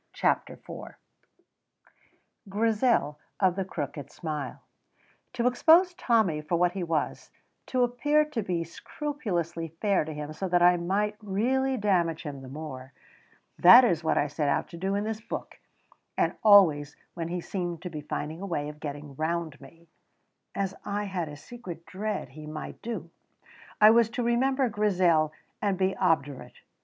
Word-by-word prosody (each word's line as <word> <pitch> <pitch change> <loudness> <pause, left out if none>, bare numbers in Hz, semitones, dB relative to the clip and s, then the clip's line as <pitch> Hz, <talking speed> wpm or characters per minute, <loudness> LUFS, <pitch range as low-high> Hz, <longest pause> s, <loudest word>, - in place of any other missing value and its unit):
CHAPTER - - 0
IV - - -10 1.5
GRIZEL 215 - +1 0.2
OF 185 -3 +3
THE 195 - -1
CROOKED 145 -5 -6
SMILE 155 -4 -5 0.7
To 240 -1 -1
expose 330 +9 +5
Tommy 220 - +1
for 155 +3 -1
what 175 +1 +3
he 190 +1 -5
was, 165 -3 -2 0.4
to 255 -1 +1
appear 290 +6 +2
to 295 -7 -3
be 180 -4 -2
scrupulously 175 - -4
fair 200 -5 +2
to 155 - -6
him 150 0 -6
so 190 +4 -3
that 175 -1 +3
I 180 0 +7
might 205 +4 -1
really 255 +7 0
damage 175 -6 +1
him 145 -4 -6
the 130 - -10
more, 135 -2 -8 0.7
that 235 +9 +10
is 170 -8 +1
what 160 - +1
I - - +3
set 145 0 -1
out - - 0
to 170 - -9
do 190 +3 -1
in 205 - 0
this 220 0 -4
book, - - -7 0.6
and - - +1
always 165 -9 +6 0.2
when 165 -2 -4
he 175 +1 -3
seemed 175 -2 -4
to 180 - -5
be 155 -2 -5
finding 150 +3 -5
a 200 - -4
way 150 -5 -2
of 150 0 -11
getting 145 -1 -7
round 160 -2 -2
me 165 +5 -16 0.7
(as 195 -1 -1
I 205 0 -2
had 185 -5 -3
a 145 - -9
secret 175 -3 -9
dread 210 +3 -4
he 155 0 -11
might 155 0 -7
do) 190 -8 -5 0.7
I 215 +1 +9
was 230 -1 +4
to 245 - 0
remember 260 +3 +2
Grizel 180 -8 +2 0.3
and 200 -3 0
be 190 0 +1
obdurate. 145 -7 -1
180 Hz, 165 wpm, -28 LUFS, 155-215 Hz, 1.5 s, that